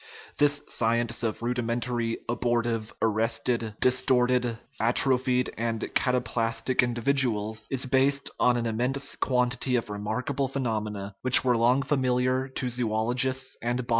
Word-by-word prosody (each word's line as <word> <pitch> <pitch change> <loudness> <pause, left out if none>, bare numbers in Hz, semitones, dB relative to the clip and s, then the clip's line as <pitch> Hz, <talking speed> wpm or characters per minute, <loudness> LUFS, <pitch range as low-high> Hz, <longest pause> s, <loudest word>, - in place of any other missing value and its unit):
* - - -21
This 145 0 +3
"science 115 0 0
of 115 0 -3
rudimentary, 120 -1 -2
abor 120 0 0
tive, 115 -2 -3
arrested, 115 0 0
distorted, 125 -2 +2 0.2
atrophied, 125 +2 +2
and 115 -1 -2
cataplastic 125 -1 0
in 120 -1 -1
dividuals" 110 -4 0
is 130 -1 0
based 135 +2 +1
on 125 -1 +3
an 120 - -2
immense 125 +5 -1
quantity 125 0 0
of 115 -3 -2
remark 105 +6 -3
able 135 0 -1
phenomena, 110 -6 -4
which 130 0 +6
were 125 -1 +3
long 120 +4 +2
familiar 130 -1 0
to 130 -1 -3
zoologists 125 +3 +1
* - - -15
Cf 120 +1 -2
125 Hz, 135 wpm, -26 LUFS, 115-130 Hz, 0.2 s, which